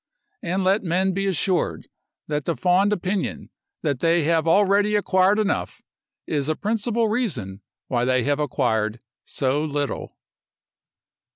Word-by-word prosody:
And 185 +3 -1
let 195 +3 +3
men 185 +2 +1
be 195 +1 -1
assured 185 0 0 0.4
that 150 -1 -2
the 170 - -1
fond 180 - +3
opinion 190 -1 -2 0.3
that 145 -5 0
they 165 +1 +2
have 165 +1 +1
already 205 +4 +3
acquired 195 0 +3
enough, 215 -2 -1 0.5
is 145 -1 -1
a 155 - +1
principal 225 +3 0
reason 140 - -2 0.3
why 120 -2 0
they 130 -1 +2
have 145 +2 0
acquired 110 -6 0 0.3
so 140 +2 -1
little. 145 -2 -3
175 Hz, 130 wpm, -23 LUFS, 145-200 Hz, 0.5 s, let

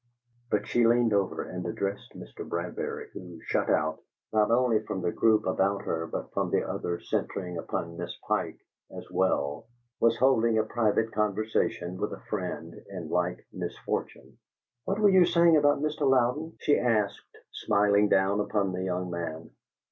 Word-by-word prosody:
But - - 0
she 120 -1 +3
leaned 120 -1 +3
over 100 -2 0
and - - -6
addressed 100 0 -4
Mr. - - -9
Bradbury, 85 +1 -4
who, 90 -2 -9
shut - - 0
out, 80 +1 +1 0.3
not 105 -1 +3
only 120 -2 +3
from 95 -3 -4
the 85 - +1
group 110 -1 +3
about 100 +2 +1
her, 80 0 -2
but - - -6
from - - 0
the - - +1
other 85 0 -3
centring 90 -3 -3
upon 85 0 -4
Miss 85 - -5
Pike, - - -1 0.3
as - - -9
well, 70 +1 0 0.3
was 115 0 +3
holding 115 -3 +3
a 110 - +3
private 110 0 +1
conversation 105 -4 -1
with 105 +2 -2
a - - -10
friend 90 -5 -4 0.2
in 90 -5 -6
like 90 0 -1
misfortune. - - -5 0.5
"What 195 - -1
were 210 -1 +5
you 190 -1 +7
saying 170 -1 +5
of 145 - +2
Mr. 145 0 +2
Louden?" 135 +6 +1
she 145 - +3
asked, 110 -4 -1
smiling 105 0 +2
down 95 +2 +3
upon 105 -2 0
the 90 - -3
young 90 -1 -2
man. 80 -2 -5
105 Hz, 165 wpm, -28 LUFS, 90-120 Hz, 0.5 s, you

